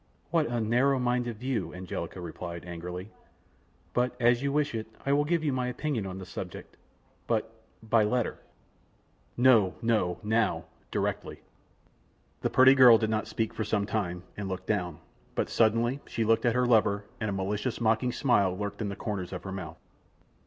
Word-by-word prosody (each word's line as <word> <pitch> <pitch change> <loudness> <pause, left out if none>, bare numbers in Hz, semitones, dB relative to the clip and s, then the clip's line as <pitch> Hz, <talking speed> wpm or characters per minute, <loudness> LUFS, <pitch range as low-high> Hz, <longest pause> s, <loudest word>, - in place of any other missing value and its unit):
"What 160 -2 +2
a 120 0 -1
narrow 125 +5 +2
minded 125 -2 0
view," 110 -9 -3
Angelica 90 +1 -5
replied, 85 0 -7
angrily, 90 +3 -6 0.8
"but 125 0 +1
as 120 0 +4
you 140 0 0
wish 145 -2 +1
it, 110 -1 -4 0.2
I 140 - +2
will 145 +1 +3
give 165 +1 +1
you 145 -3 +1
my 130 -1 -1
opinion 125 -4 -2
on 95 0 -6
the 95 - -7
subject, - - -8 0.5
but... 110 -1 0 0.3
by 110 0 +3
letter." 120 +2 0 1.0
"No, 120 -7 +5
no; 110 -7 +1
now, 110 +1 +1 0.2
directly." - - -3 1.0
The - - 0
pretty 130 +1 +7
girl 125 -4 +8
did 110 0 -1
not 110 0 -1
speak 110 -1 -2
for 110 - -2
some 105 -2 0
time, 90 -5 -2
and 100 -2 -4
looked 95 0 -5
down, 90 -7 -1 0.4
but - - -1
suddenly 115 +4 +2
she 115 - -1
looked 115 +2 +3
at 115 - +2
her 125 0 +3
lover, 105 -4 +3
and 110 - -1
a - - -1
malicious, 100 +5 -2
mocking 115 +2 +2
smile 100 -9 +2
lurked 100 +1 -4
in 105 - -1
the 100 - -4
corners 100 -4 -4
of 90 - -6
her 95 - -6
mouth. 90 -4 -6
110 Hz, 175 wpm, -29 LUFS, 95-125 Hz, 1.0 s, girl